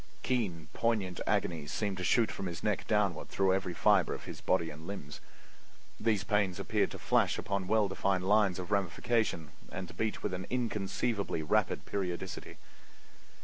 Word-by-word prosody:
Keen, 100 -11 -1
poignant 105 -6 0
agonies 80 -4 0
seemed 100 -3 -1
to 90 - -3
shoot 110 +4 +3
from 95 - -4
his 85 -2 -6
neck 105 -3 0
downward 100 -7 +1
through 95 -1 +2
every 95 -2 -1
fiber 100 -4 +4
of - - -9
his - - -8
body 85 -3 +1
and 75 +2 -10
limbs. 75 -8 -6 0.8
These 105 -3 +2
pains 105 -3 +1
appeared - - +1
to - - -7
flash - - +2
along 100 -2 -2
well 110 0 +3
defined 95 -1 0
lines 105 -3 +4
of 90 +2 -6
ramification 100 -4 0 0.2
and 90 +2 -5
to - - -10
beat 110 -2 -2
with - - -1
an 90 0 -4
inconceivably 105 -5 -1
rapid 75 - +1
periodicity. 95 -1 -4
95 Hz, 165 wpm, -32 LUFS, 90-105 Hz, 0.8 s, fiber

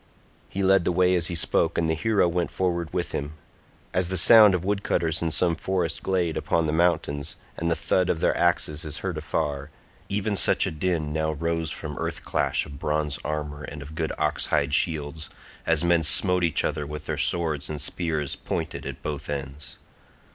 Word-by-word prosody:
He 100 - -3
led 95 -1 +4
the 90 - +1
way 90 +1 +3
as 85 -2 +2
he 85 - -3
spoke 85 0 +2
and 80 - +1
the 80 - +1
hero 100 +3 +2
went 85 0 -1
forward 85 -3 -1
with 90 -1 -2
him. 70 +2 -4 0.6
As 90 -1 +1
the 95 - +1
sound 105 +1 +8
of 90 0 -3
woodcutters 95 -5 0
in 85 - 0
some 85 +1 +1
forest 85 -1 -2
glade 90 -4 0
upon 85 -1 0
the 75 - -1
mountains—and 80 -1 -1
the 85 - +2
thud 90 +3 +1
of 80 - 0
their - - +2
axes 75 +2 +1
is 75 0 -4
heard 90 -4 -2
afar—even 80 +7 -4
such - - +4
a - - -2
din 80 -1 -1
now 80 0 0
rose 80 +1 -2
from 75 -2 -6
earth - - -3
clash - - 0
of 70 -1 -10
bronze 75 -2 -1
armour 75 -1 -4
and 75 -1 -7
of 75 +2 -11
good 80 -1 -2
ox 75 -2 0
hide 70 0 +1
shields, 80 0 0 0.4
as 80 -1 +3
men 85 -1 +3
smote 90 +3 +3
each 80 -3 +2
other 75 -1 -2
with 75 +1 -7
their - - -3
swords 80 -5 0
and 75 -1 -4
spears 80 -1 -2
pointed - - -4
at - - -8
both 75 -2 -4
ends. 70 0 -6
80 Hz, 190 wpm, -25 LUFS, 75-90 Hz, 0.6 s, sound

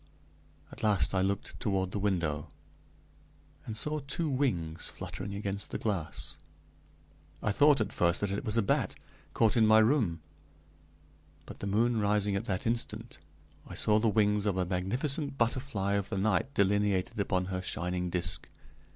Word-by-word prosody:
At - - -10
last 105 -3 +2
I 95 - +2
looked 100 +1 -2
toward 95 -3 0
the 100 - -2
window, 85 -7 -1 1.2
and 110 - -4
saw 150 +5 +1
two 150 +3 -2
wings 90 - -1
fluttering 100 +1 -6
against 100 0 -4
the - - -3
glass. 85 -11 -3 1.1
I 105 - +2
thought, 145 +5 +5
at 105 -3 -1
first, 85 0 +2
that 100 -1 0
it 100 - -2
was 110 +1 0
a 115 - +4
bat, 95 - +1 0.4
caught 110 -2 +3
in 110 -2 +5
my 110 0 +7
room; 110 - +3 1.3
but, - - -10
the 100 - -4
moon 115 +3 +2
rising 105 -1 +1
at 100 +3 -2
that 95 -5 -2
instant, 115 -1 -3 0.5
I - - -8
saw 105 0 +4
the 110 0 +2
wings 105 0 +2
of 95 -2 0
a 90 - +1
magnificent 130 - -1
butterfly 115 -4 0
of 100 -1 -1
the 100 - -2
night 105 +6 +1
delineated 100 +1 +1
upon 95 -2 +1
her 95 - -1
shining 90 0 -2
disk. 85 -1 -2
100 Hz, 160 wpm, -30 LUFS, 95-115 Hz, 1.3 s, my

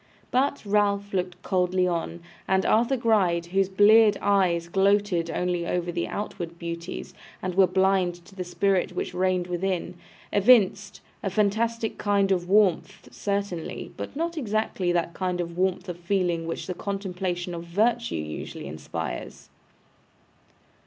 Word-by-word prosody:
But 265 -1 +1
Ralph 200 0 +1
looked 180 -1 -2
coldly 185 -1 +1
on; 170 0 -3 0.3
and 190 0 +2
Arthur 235 +4 +3
Gride, 195 -8 +2
whose 195 -1 +2
bleared 205 +2 +6
eyes 180 -4 +2
gloated 195 -2 +2
only 175 -1 -1
over 175 0 -1
the 170 0 -2
outward 175 -5 -5
beauties, 170 +1 -6 0.3
and 185 -1 -3
were 190 +1 +5
blind 190 -1 +2
to 195 - -16
the 185 -1 -4
spirit 180 +1 0
which - - -3
reigned 185 0 +1
within, 180 0 -2 0.4
evinced 205 -2 +4 0.2
a 195 - -1
fantastic 220 +3 0
kind 200 -1 +2
of 180 -1 0
warmth 195 -1 +2
certainly, 200 -4 -3
but - - -7
not 335 +2 -2
exactly 215 -6 -1
that 170 -1 0
kind 180 -1 -2
of 170 -1 -4
warmth 185 +1 0
of 175 -1 -6
feeling 175 -2 0
which 165 - -4
the 185 - -3
contemplation 180 -2 -3
of 170 0 -6
virtue 230 +7 +1
usually 75 0 -6
inspires. 75 -5 -6
190 Hz, 140 wpm, -26 LUFS, 175-205 Hz, 0.4 s, bleared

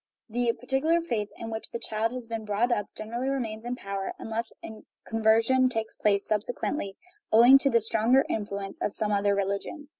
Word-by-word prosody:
The 240 +1 +1
particular 270 +8 +1
faith 225 -11 -2
in 225 0 -6
which 220 0 -5
the - - -4
child 225 0 -2
has 250 -1 -6
been 225 -1 -4
brought 215 +4 0
up 205 -4 0
generally 235 +5 -3
remains 230 -5 -3
in 245 +1 -2
power, 195 -4 -4
unless 225 +1 -4
a 220 -1 -9 0.2
"conversion" 225 +4 +3
takes 225 -2 -3
place 200 -1 +1
subsequently, 210 0 -2 0.3
owing 240 +5 +8
to 275 - +2
the 230 -3 +3
stronger 225 +5 +3
influ 200 -2 -3
ence 195 - -10
of 205 - -1
some 215 -2 -1
other 200 0 +2
religion. 200 - -3
225 Hz, 185 wpm, -27 LUFS, 210-245 Hz, 0.3 s, owing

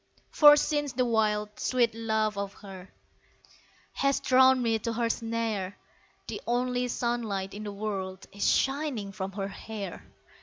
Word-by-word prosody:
For 295 -1 +8
since 290 -2 0
the 255 0 +1
wild, 210 -2 0
sweet 240 -3 +1
laugh 220 -2 0
of 200 0 -4
her 190 -2 -11 1.0
Has 275 0 +1
drawn 260 0 +5
me 225 -2 +1
to 230 +2 -3
her 230 0 +1
snare, 225 -5 -3 0.5
The - - -5
only 250 +1 0
sunlight 230 -6 -2
in 210 +1 -7
the 205 - -4
world 195 -2 -4
Is 200 0 +1
shining 270 -7 0
from 195 0 -5
her 195 0 -3
hair. 200 -2 -7
220 Hz, 145 wpm, -28 LUFS, 200-245 Hz, 1.0 s, For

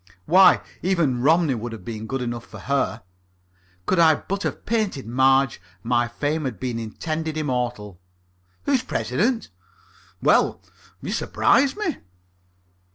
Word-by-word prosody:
Why, 185 +4 +6 0.2
even 165 -9 +1
Romney 160 +1 +3
would 120 0 -5
have 105 -5 -10
been 110 -1 -6
good 135 +1 -2
enough 120 -1 -5
for - - -11
her. 135 -6 -1 0.8
Could 185 - +1
I 160 -2 +6
but 195 +6 -4
have - - -4
painted 215 - -1
Marge, 130 +2 +2 0.2
my 120 0 +1
fame 145 +5 -2
had 120 -8 -4
been 120 -1 -3
indeed 155 +8 -4
immortal. 125 - -3 0.6
Who's 275 -4 +2
President?... 245 -1 -1 0.7
Well, - - +3 0.4
you - - -4
surprise 275 0 +2
me." 410 - -2
135 Hz, 130 wpm, -23 LUFS, 120-175 Hz, 0.8 s, Why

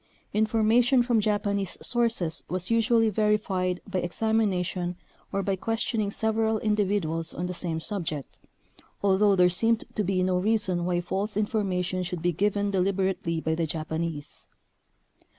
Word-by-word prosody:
In 215 +1 +2
formation 235 +4 +3
from 240 -2 +2
Japanese 205 -2 0
sources 230 -9 0
was 185 +4 -1
usually 230 -1 +3
verified 195 -4 0
by 190 -2 -1
examination 180 -2 0 0.4
or 195 - -1
by 195 0 0
questioning 225 +1 -1
sev 220 +2 0
eral 220 -1 +2
individuals 195 -6 0
on 175 - -3
the 180 - -3
same 170 -2 -2
subject, 160 -6 -5 0.6
although 200 +1 +4
there 180 -1 +5
seemed 225 +6 +1
to 210 - 0
be 185 -1 +1
no 185 0 +1
reason 190 -4 +1
why 175 -1 0
false 195 +4 -3
infor 210 +1 0
mation 180 -1 -1
should 180 -2 -5
be 175 - +3
given 205 +3 0
deliberately 190 -3 0
by 160 0 -1
the 165 0 -1
Japanese. 160 -1 -4
195 Hz, 150 wpm, -27 LUFS, 180-215 Hz, 0.6 s, there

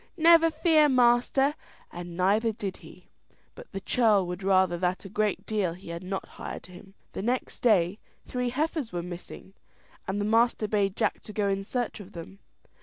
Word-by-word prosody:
"Never 330 0 +6
fear, 315 -1 +4
master!" 255 +2 +3 0.4
and 175 0 -8
neither 210 +5 +2
did 200 -3 -5
he. - - -16 0.4
But - - -13
the 195 - -5
churl 215 -5 +3
would 180 +1 -5
rather 190 -2 +3
than 180 +1 0
a - - -7
great 210 0 -1
deal 205 -6 -1
he 175 0 -12
had 170 0 -5
not 190 +1 -4
hired - - -8
him. 190 +2 -14 0.2
The - - -4
next 245 +5 -2
day 200 -4 +3 0.3
three 250 -1 -2
heifers 295 -1 -2
were 175 -1 -3
missing, 180 +2 -9 0.5
and 195 +2 -2
the 205 - -1
master 225 0 +2
bade 200 -2 0
Jack 215 - 0
go 205 -2 +1
in 195 0 -1
search 245 +3 -3
of 205 -1 -12
them. 170 +3 -10
205 Hz, 180 wpm, -27 LUFS, 185-245 Hz, 0.5 s, Never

